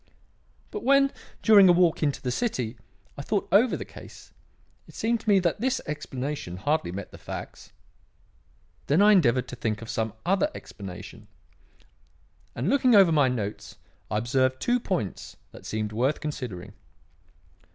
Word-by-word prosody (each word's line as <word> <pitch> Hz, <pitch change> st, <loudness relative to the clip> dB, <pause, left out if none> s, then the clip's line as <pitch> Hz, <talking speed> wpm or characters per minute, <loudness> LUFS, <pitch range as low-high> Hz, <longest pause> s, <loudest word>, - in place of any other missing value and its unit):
But 420 Hz, -, -5 dB
when, 275 Hz, 0 st, +4 dB, 0.3 s
during 205 Hz, -4 st, +7 dB
a -, -, +9 dB
walk 175 Hz, -2 st, +3 dB
into 145 Hz, -3 st, -1 dB
the 125 Hz, -, -1 dB
City, 125 Hz, -, -2 dB, 0.4 s
I -, -, -3 dB
thought 200 Hz, +7 st, -1 dB
over 225 Hz, +5 st, +4 dB
the -, -, -6 dB
case, -, -, -13 dB, 0.6 s
it -, -, -16 dB
seemed 230 Hz, +1 st, 0 dB
to 220 Hz, -, -4 dB
me 200 Hz, -, +6 dB
that 180 Hz, +2 st, 0 dB
this 260 Hz, +1 st, +1 dB
explanation 135 Hz, -9 st, -5 dB
hardly 145 Hz, -, -1 dB
met 100 Hz, +2 st, -7 dB
the -, -, -12 dB
facts. -, -, -8 dB, 1.2 s
Then 145 Hz, +5 st, +3 dB
I 205 Hz, +1 st, +7 dB
endeavoured 130 Hz, -, +3 dB
to -, -, -6 dB
think 110 Hz, -3 st, -2 dB
of 115 Hz, -, -7 dB
some 110 Hz, -2 st, -2 dB
other 195 Hz, -, +2 dB
explanation; -, -, -10 dB, 1.3 s
and -, -, -2 dB
looking 255 Hz, -4 st, +4 dB
over 195 Hz, -4 st, +7 dB
my 145 Hz, -4 st, +4 dB
notes 110 Hz, -5 st, -4 dB, 0.3 s
I 105 Hz, -, -1 dB
observed 130 Hz, +3 st, +1 dB
two 245 Hz, +1 st, +1 dB
points 175 Hz, -, -4 dB
that -, -, -12 dB
seemed 110 Hz, -1 st, -3 dB
worth 130 Hz, +7 st, 0 dB
considering. 125 Hz, -, -6 dB
150 Hz, 155 wpm, -26 LUFS, -, 1.3 s, a